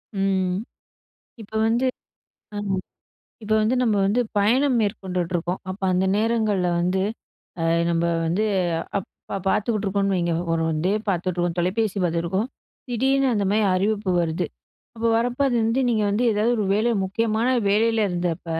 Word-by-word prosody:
ம். 190 -2 +1 0.9
இப்ப 215 +1 -14
வந்து 235 +3 +1 0.7
அ - - -5 0.9
இப்ப 210 - -6
வந்து 220 +4 +2
நம்ம 225 -4 +2
வந்து 205 +5 +2 0.2
பயணம் 250 +5 +3
மேற்கொண்டுட்ருக்கோம். 180 -3 -2
அப்போ 190 +1 -6
அந்த 185 +1 +2
நேரங்கள்ல 215 -4 +1
வந்து 180 +2 +1 0.6
அ - - 0 0.3
நம்ம 165 0 +1 0.2
வந்து 180 +7 +1 0.5
அப்ப 195 +1 -7
பார்த்துக்கிட்டுருக்கோம்னு 200 -2 0
வைங்க. 170 -2 0 0.2
ஒரு 165 0 +1 0.2
டிவி 205 +3 +1
பார்த்துட்ருக்கோம், 175 -1 -1
தொலைபேசி 200 +4 0
பார்த்துருக்கோம். 175 +6 -1 0.4
திடீர்னு 270 +3 +2
அந்த 205 - 0
மாரி 215 0 +2
அறிவிப்பு 205 +1 0
வருது. 165 -1 -1 0.5
அப்போ 230 +1 0
வரப்போ 245 +3 0
அது 245 - 0
வந்து 230 +4 +1
நீங்க 220 -3 +1
வந்து 215 +5 +1
ஏதாது 215 +3 +1
ஒரு 215 - 0
வேலை 225 +3 +2
முக்கியமான 220 +4 0 0.2
வேலையில 220 +1 +2
இருந்தப்ப. 175 -1 -2
205 Hz, 135 wpm, -23 LUFS, 180-225 Hz, 0.9 s, பயணம்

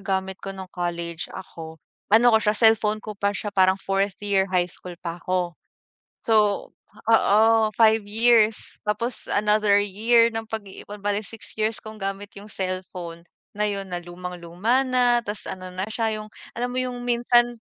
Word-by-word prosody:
gamit 190 -1 -2
ko - - -7
nung 190 -1 -7
college 170 -1 -4
ako, 165 -4 -9 0.3
ano 230 +3 +6
ko 220 - +5
siya, 210 0 +1
cellphone 215 -2 +3
ko 215 - -5
pa 200 0 0
siya 205 0 -4
parang 190 -1 +4
4th 195 0 -1
year 195 -1 +2
highschool 180 -1 -2
pa 170 0 -5
‘ko. 180 -1 -1 0.7
So, 210 -3 +2 0.4
oo, 215 -2 +5 0.3
5 220 -2 +4
years, 225 0 +2
tapos 225 +3 -2
another 210 -1 +3
year 230 +4 +3
ng 225 -1 -5
pag-iipon, 205 -1 -8
bale 205 +1 -1
6 225 -1 -10
years 215 0 -1
kong 215 0 -10
gamit 195 0 -4
yung 205 - -11
cellphone 185 -3 -5 0.3
na 210 - +2
yun 195 -2 -4
na 175 - -2
lumang 175 +1 -8
luma 200 +11 0
na, 245 -1 +3
ta's 205 +1 -4
ano 185 -1 -7
na 185 - -3
siya, 220 -1 -1
yung 215 - -13 0.2
alam 245 +1 -2
mo 250 - -3
yung 250 -1 -3
minsan 240 0 +2
205 Hz, 165 wpm, -24 LUFS, 185-225 Hz, 0.7 s, ano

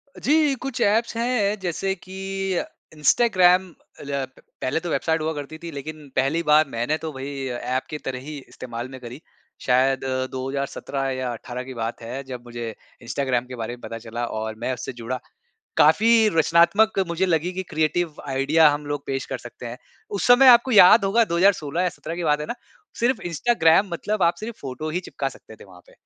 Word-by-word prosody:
अ, - - -11
जी, 295 -1 +3
कुछ 270 -3 -4
ऐप्स 225 +2 +2
हैं 230 -4 +1
जैसे 190 +1 -2
कि 195 +1 -4
अ, - - -1 0.3
इंस्टाग्राम 185 - +4 0.3
ऐ 140 -1 -3
प - - -19 0.2
पहले 130 - 0
तो 175 - -5
वेबसाइट 160 0 0
हुआ 160 +1 -1
करती 145 +1 -7
थी 170 - -6
लेकिन 150 +1 -8
पहली 135 +5 +1
बार 150 0 +5
मैंने 120 +6 -1
तो 160 0 -6
वही 135 0 -5
ऐप 125 +1 -2
की 150 - -4
तरह 130 -1 -3
ही 155 -1 -6
इस्तेमाल 120 -1 -7
में 130 0 -9
करी। 120 +2 -9 0.5
शायद 130 +1 +3 0.3
2017 135 +1 -3
या 130 -1 -2
18 125 +2 -6
की 130 +1 -8
बात 115 -1 -4
है, 125 +4 -6
जब 125 -2 -8
मुझे 120 -1 -5 0.3
इंस्टाग्राम 125 0 -1
के 125 0 -8
बारे 115 0 -4
में 120 - -20
पता 115 - -6
चला 120 +2 -4 0.2
और 110 0 -4
मैं 130 +3 -1
उससे 130 - -6
जुड़ा। 120 +2 -5 0.6
काफ़ी 210 +10 +5 0.3
रचनात्मक 170 +7 +4
मुझे 170 +3 0
लगी 170 0 0
कि 190 +1 -3
क्रिएटिव 160 +1 0
आईडिया 145 +4 +4
हम 145 0 -4
लोग 145 -1 -3
पेश 135 -1 -3
कर 130 - -2
सकते 120 0 -10
हैं। 120 +1 -7 0.4
उस - - -1
समय 245 +2 +7
आपको 240 +1 +7
याद 205 +1 +8
होगा 225 +4 +3
2016 170 -3 +2
या 180 - +2
17 165 - -5
की 175 - -3
बात 150 -1 +2
है 150 - -4
ना? - - -3 0.5
सिर्फ़ 240 -1 +2
इंस्टाग्राम 170 0 +3
मतलब 205 +4 -2
आप 170 0 +4
सिर्फ़ 225 +1 -6
फोटो 140 +3 -5
ही 175 +3 -1
चिपका 140 -6 -4
सकते 110 - -15
थे - - -14
वहाँ 90 -3 -16
पे। - - -20
150 Hz, 200 wpm, -23 LUFS, 130-185 Hz, 0.6 s, याद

